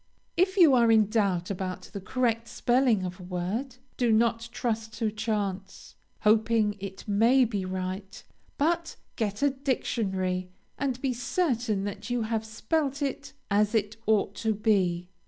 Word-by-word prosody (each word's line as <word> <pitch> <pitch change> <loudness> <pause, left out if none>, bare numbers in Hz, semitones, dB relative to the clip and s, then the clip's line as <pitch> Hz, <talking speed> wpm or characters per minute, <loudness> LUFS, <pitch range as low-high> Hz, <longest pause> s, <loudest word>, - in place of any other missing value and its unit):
If 375 +2 +2
you 330 -7 +7
are 235 -2 +5
in 215 -2 +4
doubt 195 -5 +1
about 185 -1 -5
the 200 - -5
correct 230 +2 0
spelling 240 -5 +2
of 180 +1 -6
a - - -9
word, 190 +9 -3 0.2
do 240 -2 +2
not 230 +1 +2
trust 225 -2 -2
to 220 -1 -1
chance, 205 -3 -3 0.3
hoping 215 -1 +3
it 195 +1 -8
may 230 +6 +4
be 205 -5 -2
right, 185 +1 -5 0.3
but 335 +3 0 0.2
get 210 +2 -2
a 285 - +4
dictionary, 190 -9 -1 0.3
and 260 -2 -2
be 265 -2 +1
certain 245 - 0
that 205 +4 -5
you 245 -1 0
have 220 0 -1
spelt 280 +5 -1
it 275 -2 -4 0.2
as 210 +2 +3
it 210 0 0
ought 215 -2 +2
to 220 -1 0
be. 185 -5 +1
220 Hz, 155 wpm, -28 LUFS, 200-245 Hz, 0.3 s, you